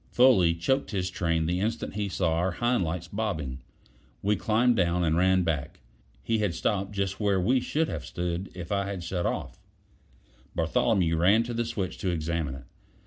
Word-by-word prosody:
Foley 95 -10 +5
choked 130 +12 0
his 90 -3 -2
train 85 -2 0
the 90 +2 0
instant 110 +4 -2
he 100 0 -2
saw 90 -3 0
our 85 +3 0
hind 120 0 +1
lights 85 +1 -3
bobbing. 85 -12 -3 0.6
We 105 +2 +3
climbed 115 +4 +2
down, 90 -2 +2
and 80 -1 +2
ran 95 +1 +3
back. 80 0 -2 0.4
He 115 -1 0
had 100 -5 0
stopped 100 +1 -1
just 100 -1 -2
where 100 -3 +2
we 125 +9 +3
should 155 +5 0
have - - -4
stood 90 +1 -3
if 90 0 -7
I 100 -1 0
had 95 -3 -4
shut 85 0 -1
off. - - -4 1.0
Bartholomew 85 +1 +2
ran 100 +7 +4
to 120 +1 -5
the 120 0 -1
switch 95 -6 -4
to 95 - -1
examine 80 -4 -2
it. 65 - -10
95 Hz, 185 wpm, -27 LUFS, 85-105 Hz, 1.0 s, Foley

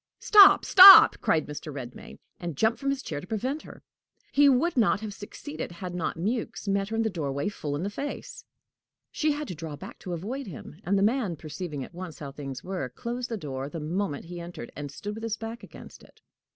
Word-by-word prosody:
"Stop, 410 -2 +7
stop!" 385 0 +10
cried 155 -2 +1
Mr. 150 +1 -7
Redmain, 130 -3 -9 0.2
and 170 -5 -6
jumped 220 +6 +1
from 275 - -2
his 275 -1 -2
chair 145 - -5
to - - -12
prevent 255 +9 -3
her. - - -14 0.5
He 285 0 +5
would 275 +7 +2
not 220 -4 +2
have 215 -2 -6
succeeded 210 - -8
had 175 +1 -7
not 175 -2 -3
Mewks 215 +4 -3
met 195 0 0
her 225 - -3
in 225 - +1
the 220 - 0
doorway 145 -2 -3
full 150 -8 -5
in 150 - -3
the 200 - -2
face. 280 +7 -6 0.7
She 305 -1 0
had 295 0 -5
to - - -4
draw 160 -2 -7
back 145 - -11
to 180 - -6
avoid 230 +10 -5
him, 165 0 -10
and 200 +2 +1
the 195 - +2
man, 215 -5 +1
perceiving 155 -1 -6
at - - -12
once 175 -3 -8
how 140 -2 -7
things 135 -3 -8
were, 180 -8 -4
closed 240 - -5
the 225 - -3
door 135 -5 -5
the 165 - -6
moment 165 0 -3
he 175 +1 -8
entered, 170 -8 -8
and 145 0 -6
stood 205 +9 -7
with 220 - -8
his 225 -1 -2
back 225 +1 -7
against - - -13
it. - - -20
185 Hz, 220 wpm, -27 LUFS, 150-230 Hz, 0.7 s, stop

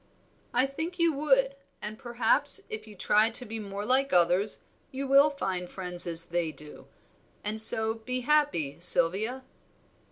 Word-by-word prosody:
"I 250 +2 +2
think 320 +6 -6
you 335 -2 +1
would, 275 -1 +1 0.2
and 215 +1 -8
perhaps 250 - +2
if 215 0 -7
you 210 - -13
try 210 +3 +2
to 240 +2 -1
be 225 0 -7
more 200 -1 -7
like 265 +3 +1
others 180 +4 +3 0.3
you 270 +1 -6
will 275 +2 +5
find 185 -11 -5
friends 180 -2 -3
as 165 -1 +4
they 170 -2 -2
do, 150 -1 -14 0.6
and 215 +1 +3
so 220 0 +2
be 250 +3 -5
happy, 265 - 0
Sylvia." 195 +9 +2
220 Hz, 155 wpm, -27 LUFS, 185-270 Hz, 0.6 s, will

